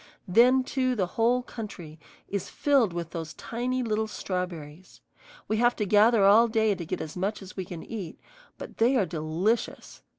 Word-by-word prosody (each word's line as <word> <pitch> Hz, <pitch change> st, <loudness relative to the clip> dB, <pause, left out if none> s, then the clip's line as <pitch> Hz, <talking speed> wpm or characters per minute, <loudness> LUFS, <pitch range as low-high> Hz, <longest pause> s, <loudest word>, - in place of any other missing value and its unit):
Then 245 Hz, +7 st, +5 dB
too 255 Hz, -1 st, -1 dB
the 195 Hz, -5 st, +1 dB
whole 240 Hz, +2 st, +2 dB
country 180 Hz, -10 st, -9 dB, 0.3 s
is 200 Hz, -2 st, -4 dB
filled 275 Hz, -9 st, +2 dB
with 170 Hz, -1 st, -5 dB
those 165 Hz, -2 st, -6 dB
tiny 250 Hz, +2 st, -3 dB
little 220 Hz, -1 st, -1 dB
strawberries. 180 Hz, -5 st, -6 dB, 0.5 s
We 215 Hz, -, 0 dB
have 240 Hz, +1 st, +3 dB
to 210 Hz, -, -1 dB
gather 210 Hz, +1 st, +5 dB
all 220 Hz, +4 st, +6 dB
day 220 Hz, -2 st, +2 dB
to 180 Hz, -3 st, -6 dB
get -, -, -3 dB
as 155 Hz, -, -7 dB
much 195 Hz, +4 st, -2 dB
as 185 Hz, -, -12 dB
we 190 Hz, -, -4 dB
can 170 Hz, -2 st, -8 dB
eat, 200 Hz, -8 st, -7 dB, 0.4 s
but -, -, -10 dB
they 240 Hz, +4 st, +4 dB
are 220 Hz, -7 st, +3 dB
delicious. 165 Hz, +8 st, -2 dB
210 Hz, 175 wpm, -27 LUFS, 180-235 Hz, 0.5 s, all